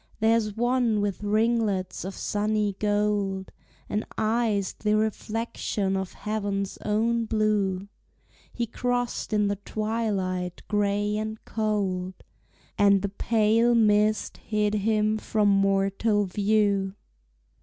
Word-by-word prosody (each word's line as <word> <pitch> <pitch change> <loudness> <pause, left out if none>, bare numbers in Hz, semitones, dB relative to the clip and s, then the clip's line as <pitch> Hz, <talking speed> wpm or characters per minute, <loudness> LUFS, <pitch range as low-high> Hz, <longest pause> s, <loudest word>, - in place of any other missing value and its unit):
There's 220 -1 +2
one 240 -2 +2
with 205 -1 -2
ringlets 210 -3 0
of 190 +1 -5
sunny 210 -1 -1
gold, 205 -2 0 0.4
And 210 - -1
eyes 215 -3 +1
the 210 0 0
reflection 215 -2 -1
of 190 -1 -3
heaven's 205 -2 -3
own 230 +2 +1
blue; 210 -3 0 0.6
He 240 - -2
crossed 245 +1 -2
in 210 -1 +2
the 200 0 -1
twilight 200 -4 -2
gray 205 0 0
and 215 0 -3
cold, 195 -4 -1 0.6
And 200 -1 +5
the 200 - 0
pale 225 +3 +2
mist 215 -1 +2
hid 210 -1 -1
him 215 +1 +1
from 210 -1 +1
mortal 195 +2 +2
view. 200 0 +1
210 Hz, 110 wpm, -26 LUFS, 200-220 Hz, 0.6 s, And